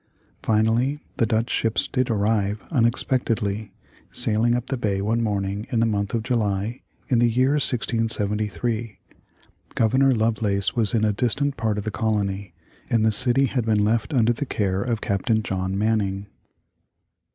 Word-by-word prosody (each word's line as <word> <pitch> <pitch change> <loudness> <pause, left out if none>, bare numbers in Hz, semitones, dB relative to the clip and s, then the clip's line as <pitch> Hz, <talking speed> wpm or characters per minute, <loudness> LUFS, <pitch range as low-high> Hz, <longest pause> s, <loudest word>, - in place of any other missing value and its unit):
Finally 115 +6 +1 0.2
the 115 - +2
Dutch 115 +1 0
ships 115 -1 +1
did 130 -1 -1
arrive 105 -1 0
unexpectedly, 115 -5 0 0.4
sailing 115 +2 +2
up 120 0 -2
the 135 - -3
bay 105 -5 -1
one 110 +4 0
morning 100 -1 -2
in 120 - 0
the 115 - +3
month 100 0 -1
of 115 - -1
July, 110 -2 -1 0.3
in 125 -4 +3
the 120 0 +4
year 130 +4 +2
1673. 115 - -1 0.8
Governor 130 +4 +3
Lovelace 110 -2 +2
was 115 -3 +1
in 110 -1 +2
a 105 - +1
distant 130 +6 0
part 110 -3 -1
of 105 - -3
the 110 - -3
colony, 100 -4 -2 0.4
and 115 -3 +2
the 110 - +3
city 130 +4 +3
had 130 -2 -1
been 110 -2 +1
left 115 +5 0
under 120 -4 +3
the 140 +4 -4
care 95 -4 -1
of 115 0 -2
Captain 110 +3 0
John 95 0 -2
Manning. 100 -2 0
110 Hz, 155 wpm, -23 LUFS, 105-120 Hz, 0.8 s, the